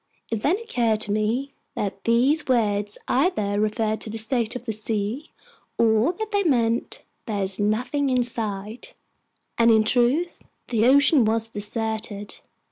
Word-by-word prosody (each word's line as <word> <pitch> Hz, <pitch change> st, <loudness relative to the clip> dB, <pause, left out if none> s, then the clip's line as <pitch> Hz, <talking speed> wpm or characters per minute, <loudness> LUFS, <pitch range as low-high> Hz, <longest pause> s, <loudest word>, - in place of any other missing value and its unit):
It 225 Hz, -2 st, -2 dB
then 320 Hz, -, +2 dB
occurred 240 Hz, -, 0 dB
to 205 Hz, -, 0 dB
me 225 Hz, +7 st, -1 dB, 0.2 s
that 195 Hz, -1 st, -4 dB
these 250 Hz, +7 st, +3 dB
words 205 Hz, -5 st, 0 dB
either 215 Hz, -, +1 dB
referred 215 Hz, 0 st, -1 dB
to -, -, -4 dB
the 225 Hz, -, -4 dB
state 230 Hz, +1 st, 0 dB
of 250 Hz, -, -7 dB
the 225 Hz, -, -2 dB
sea, 215 Hz, +6 st, -2 dB, 0.5 s
or 225 Hz, +5 st, +3 dB
that 435 Hz, +4 st, -6 dB
they 405 Hz, -1 st, +2 dB
meant: 240 Hz, -9 st, 0 dB, 0.2 s
"There's 200 Hz, -3 st, -1 dB
nothing 250 Hz, +7 st, 0 dB
in 250 Hz, -1 st, +2 dB
sight." 220 Hz, -, -4 dB, 0.6 s
And 230 Hz, 0 st, +5 dB
in 220 Hz, -1 st, +5 dB
truth, 250 Hz, +10 st, +1 dB, 0.3 s
the 230 Hz, -1 st, +2 dB
ocean 280 Hz, 0 st, +5 dB
was 225 Hz, +1 st, 0 dB
deserted. 210 Hz, -1 st, -3 dB
225 Hz, 145 wpm, -24 LUFS, 215-255 Hz, 0.6 s, And